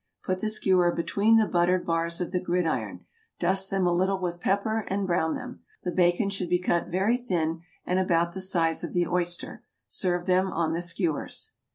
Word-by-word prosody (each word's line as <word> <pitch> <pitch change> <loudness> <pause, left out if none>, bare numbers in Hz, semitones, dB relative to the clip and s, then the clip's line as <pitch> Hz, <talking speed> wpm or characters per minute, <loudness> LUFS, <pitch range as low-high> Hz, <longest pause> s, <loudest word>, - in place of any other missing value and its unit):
Put 185 0 -1
the 215 - -1
skewer 185 -4 +3
between 200 +7 +2
the 220 - +4
buttered 180 0 +1
bars 165 0 -1
of 180 -1 -3
the 180 - 0
gridiron, 175 -2 -2 0.3
dust 190 +2 +1
them 195 -2 +1
a 175 - +2
little 190 +2 +1
with 175 -2 -3
pepper 215 +4 0
and 195 0 -1
brown 170 -3 0
them. 250 0 -8 0.2
The 180 - -2
bacon 175 +3 +2
should 185 -3 -2
be 180 - +3
cut 175 -1 0
very 195 +7 +1
thin 165 -9 -2 0.2
and 180 +1 +1
about 170 -2 +1
the 190 - -4
size 170 -4 +1
of - - -5
the 175 -1 +2
oyster. 175 0 -2 0.3
Serve 175 -1 -1
them 185 +1 +2
on 165 -1 0
the 170 - -1
skewers. 175 -3 -2
180 Hz, 195 wpm, -27 LUFS, 170-190 Hz, 0.3 s, the